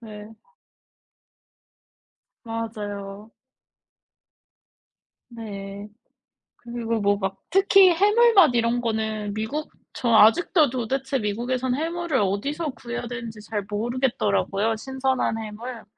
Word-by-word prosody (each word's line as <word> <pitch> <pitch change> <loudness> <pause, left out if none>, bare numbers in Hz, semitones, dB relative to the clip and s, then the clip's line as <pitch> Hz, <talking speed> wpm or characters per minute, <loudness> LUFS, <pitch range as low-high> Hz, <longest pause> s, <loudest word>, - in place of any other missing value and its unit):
네. 210 -2 -10 2.2
맞아요. 210 -2 -6 2.0
네. 200 -3 -8 0.7
그리고 235 -1 -3
뭐 200 0 +2
막 195 -1 -4
특히 390 0 +6
해물맛 405 - +5
이런 235 +1 +1
거는 220 -2 -2
미국 220 +9 -4 0.2
저 240 - -2
아직도 285 - +5
도대체 265 +2 -2
미국에선 245 +4 -1
해물을 330 0 -2
어디서 280 - -1
구해야 240 -1 -6
되는지 230 -2 -7
잘 210 -1 -4
모르겠더라고요, 220 - 0
신선한 265 -1 -1
해물. 225 +2 -7
230 Hz, 215 characters per minute, -24 LUFS, 210-265 Hz, 2.2 s, 특히